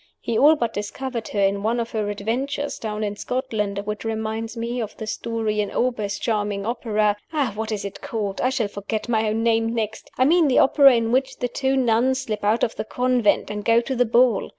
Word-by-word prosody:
He 230 Hz, -, -3 dB
all 295 Hz, +7 st, +6 dB
but 235 Hz, -6 st, -2 dB
discovered 230 Hz, +3 st, -4 dB
her 205 Hz, -, -3 dB
in 200 Hz, 0 st, +2 dB
one 230 Hz, +3 st, 0 dB
of 235 Hz, 0 st, -3 dB
her 215 Hz, -2 st, -1 dB
adventures 255 Hz, +8 st, -3 dB
(down 215 Hz, -1 st, -3 dB
in 205 Hz, -1 st, -2 dB
Scotland), 220 Hz, -6 st, -2 dB
which 210 Hz, 0 st, -4 dB
reminds 220 Hz, +1 st, -3 dB
me 235 Hz, +2 st, -2 dB
of 215 Hz, -2 st, -6 dB
the 220 Hz, -, -5 dB
story 220 Hz, -1 st, -2 dB
in 205 Hz, -, -2 dB
Auber's 225 Hz, -5 st, -1 dB
charming 205 Hz, -3 st, -1 dB
opera 215 Hz, -3 st, 0 dB, 0.4 s
what 220 Hz, +1 st, -4 dB
is 205 Hz, -2 st, -3 dB
it 200 Hz, -, -7 dB
called? 205 Hz, -4 st, -3 dB
I 255 Hz, -, +2 dB
shall 240 Hz, -5 st, 0 dB
forget 205 Hz, +2 st, -4 dB
my 220 Hz, -2 st, +1 dB
own 220 Hz, +1 st, -1 dB
name 225 Hz, 0 st, +1 dB
next! 220 Hz, -1 st, -3 dB
I 255 Hz, -, +4 dB
mean 330 Hz, +2 st, +4 dB
the 260 Hz, -, +2 dB
opera 275 Hz, -1 st, +6 dB
in 230 Hz, -1 st, 0 dB
which 260 Hz, +2 st, +1 dB
the 245 Hz, -, -1 dB
two 265 Hz, +2 st, 0 dB
nuns 255 Hz, +2 st, +2 dB
slip 215 Hz, -5 st, -4 dB
out 215 Hz, +3 st, +2 dB
of 230 Hz, -, 0 dB
the -, -, -2 dB
convent, 245 Hz, -3 st, +1 dB
and 210 Hz, 0 st, -4 dB
go 230 Hz, +1 st, +4 dB
to 260 Hz, +3 st, -3 dB
the 245 Hz, 0 st, +3 dB
ball. 235 Hz, -2 st, +3 dB
225 Hz, 220 wpm, -23 LUFS, 210-245 Hz, 0.4 s, all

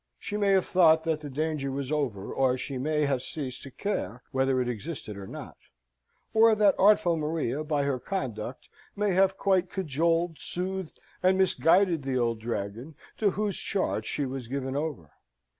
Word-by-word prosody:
She 205 Hz, -, -5 dB
may 205 Hz, -1 st, +1 dB
have 190 Hz, -1 st, +3 dB
thought 160 Hz, -3 st, +5 dB
that 160 Hz, -2 st, -1 dB
the 145 Hz, -, -6 dB
danger 150 Hz, 0 st, -2 dB
was 135 Hz, 0 st, -4 dB
over, 125 Hz, -10 st, -2 dB
or 130 Hz, -1 st, +2 dB
she 130 Hz, 0 st, -4 dB
may 150 Hz, +2 st, +1 dB
have 135 Hz, -3 st, 0 dB
ceased 130 Hz, -2 st, -5 dB
to 135 Hz, -, -9 dB
care 125 Hz, -, -3 dB
whether 135 Hz, -1 st, +2 dB
it 125 Hz, -, 0 dB
existed 125 Hz, -1 st, -5 dB
or 100 Hz, -1 st, -8 dB
not, -, -, -9 dB, 0.8 s
or 225 Hz, 0 st, +6 dB
that 205 Hz, -2 st, +5 dB
artful 190 Hz, -4 st, +5 dB
Maria, 155 Hz, -3 st, -1 dB
by 150 Hz, -2 st, 0 dB
her 140 Hz, -2 st, 0 dB
conduct, 125 Hz, -, -4 dB, 0.3 s
may 205 Hz, -1 st, +1 dB
have 190 Hz, +1 st, +3 dB
quite 185 Hz, -2 st, +2 dB
cajoled, 165 Hz, -1 st, 0 dB
soothed, 185 Hz, -1 st, -4 dB, 0.2 s
and 185 Hz, +1 st, +4 dB
misguided 185 Hz, -2 st, +3 dB
the 135 Hz, -1 st, -1 dB
old 115 Hz, -2 st, 0 dB
Dragon, 115 Hz, +5 st, -4 dB, 0.2 s
to 210 Hz, -, +4 dB
whose 205 Hz, 0 st, -1 dB
charge 145 Hz, -, -2 dB
she 145 Hz, -, -1 dB
was 130 Hz, -2 st, -5 dB
given 135 Hz, +1 st, -3 dB
over. 145 Hz, -, -3 dB
150 Hz, 175 wpm, -28 LUFS, 130-185 Hz, 0.8 s, or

